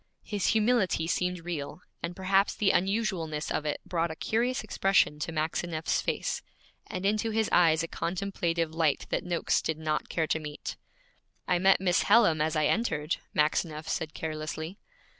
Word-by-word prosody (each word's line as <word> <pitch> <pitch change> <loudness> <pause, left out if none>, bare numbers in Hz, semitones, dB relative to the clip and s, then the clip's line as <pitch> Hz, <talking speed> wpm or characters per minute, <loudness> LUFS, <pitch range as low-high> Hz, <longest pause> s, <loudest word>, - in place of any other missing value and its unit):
His 205 -3 -2
humility 215 -7 +2
seemed 180 0 -1
real, 160 -1 -5 0.2
and 170 +1 -4
perhaps 195 +1 +2
the 200 -2 +3
unusualness 185 -6 0
of 155 - -1
it 150 - -1
brought 170 -1 0
a 160 - -5
curious 245 - 0
expression 190 -6 +2
to 155 - -3
Maxineff's 160 +1 -1
face, - - -2 0.5
and 185 +1 -4
into 215 +3 +1
his 220 0 +1
eyes 165 -2 +4
a - - -3
contemplative 170 -3 -2
light 160 -3 +1
that - - 0
Noakes 175 -2 +1
did 160 - -2
not 155 -1 -2
care 160 - 0
to 160 - 0
meet. 150 -1 -6 0.7
'I 180 - +2
met 190 +1 +5
Miss 180 -2 +3
Hallam 205 -8 +5
as 155 +1 +1
I 155 -1 +2
entered,' 160 -9 0 0.2
Maxineff 155 +1 +1
said 160 -4 -3
carelessly. 160 +3 -5
170 Hz, 160 wpm, -29 LUFS, 155-195 Hz, 0.7 s, met